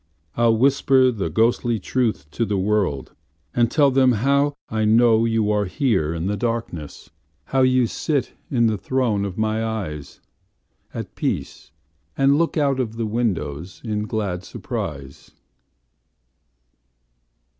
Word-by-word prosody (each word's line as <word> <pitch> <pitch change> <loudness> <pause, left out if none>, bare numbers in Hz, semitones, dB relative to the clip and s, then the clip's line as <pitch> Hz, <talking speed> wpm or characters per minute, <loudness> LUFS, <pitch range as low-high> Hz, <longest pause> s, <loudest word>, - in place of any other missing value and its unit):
I'll 115 -1 +3
whisper 130 0 +4
the 105 -5 -3
ghostly 115 +1 +1
truth 110 - -1
to 115 - -1
the 105 -3 -1
worldAnd 105 - -2
tell 140 +1 +3
them 130 -1 +4
howI 140 -1 0
know 115 0 +4
you 105 -2 +1
here 95 - 0
in 85 +1 -3
the 100 +2 0
darkness, 115 -10 -4 0.3
How 135 - 0
you 130 -1 +4
sit 140 +4 -2 0.2
in 120 -5 +2
the 110 -3 +1
throne 115 -6 0
of 95 -2 -6
my 110 0 0
eyesAt 100 -11 -8
peace, - - -4 0.5
and 135 +1 +4
look 170 0 0
out 140 -3 +1
of 115 -3 -2
the 115 - -1
windowsIn 105 - -3
glad 100 -5 -3
surprise. 70 -6 -7
115 Hz, 120 wpm, -22 LUFS, 100-130 Hz, 0.5 s, whisper